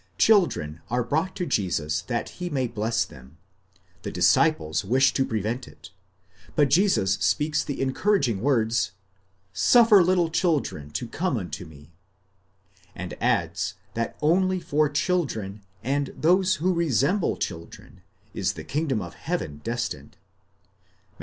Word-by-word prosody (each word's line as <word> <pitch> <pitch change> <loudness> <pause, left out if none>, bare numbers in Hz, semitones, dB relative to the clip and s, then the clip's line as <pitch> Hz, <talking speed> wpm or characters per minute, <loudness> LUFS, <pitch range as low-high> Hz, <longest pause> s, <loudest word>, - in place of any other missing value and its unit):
Children 130 - +2
are 125 +1 0
brought 160 +9 -1
to 185 -3 -2
Jesus 80 - -1
that 120 +5 -3
he 180 - -2
may 135 -5 0
bless 110 -1 -1
them; 70 -3 -15 0.6
the - - -5
disciples 80 +2 +2
wish 130 +7 +3
to 135 - +2
prevent 110 +1 -3
it, - - -14 0.6
but 145 -3 +3
Jesus 160 - +3
speaks 150 +10 +1
the 145 - -5
encouraging 135 - +1
words, 115 -7 +1 0.6
Suffer 225 - +6
little 175 -2 +2
chil 165 -2 +2
dren 75 - -8
to 120 +10 -4
come 165 +2 -1
unto 95 -1 -6
me, 75 -1 -15 1.0
and - - -6
adds - - 0 0.2
that 115 0 -3
only 185 +4 +2
for 150 -3 +1
children, 140 - -1 0.2
and 140 +2 0
those 185 +3 +3
who 185 +2 0
resemble 170 - +1
children, 85 -3 -7 0.3
is - - -1
the - - -8
kingdom 140 - -1
of 85 - -9
heaven 75 0 -4
destined 115 - -4 0.9
(Matt. - - -34
130 Hz, 135 wpm, -25 LUFS, -, 1.0 s, Suffer